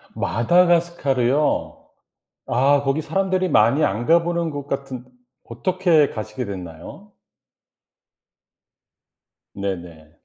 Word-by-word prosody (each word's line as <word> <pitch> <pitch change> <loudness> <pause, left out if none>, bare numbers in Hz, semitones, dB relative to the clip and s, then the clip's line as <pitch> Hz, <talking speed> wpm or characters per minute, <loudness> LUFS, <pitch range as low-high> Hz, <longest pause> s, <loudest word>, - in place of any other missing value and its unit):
마다카스카르요? 150 -2 +1 0.6
아 140 +3 +2
거기 135 +2 0
사람들이 185 +2 -1
많이 120 +7 +3
안 120 -2 -1
가보는 170 0 +2
곳 145 -2 -6
같은 135 -3 -5 0.4
어떻게 160 +4 +1
가시게 110 +3 -5
됐나요? 90 -5 -9 2.4
네네. 85 -6 -6
140 Hz, 200 characters per minute, -21 LUFS, 115-170 Hz, 2.4 s, 많이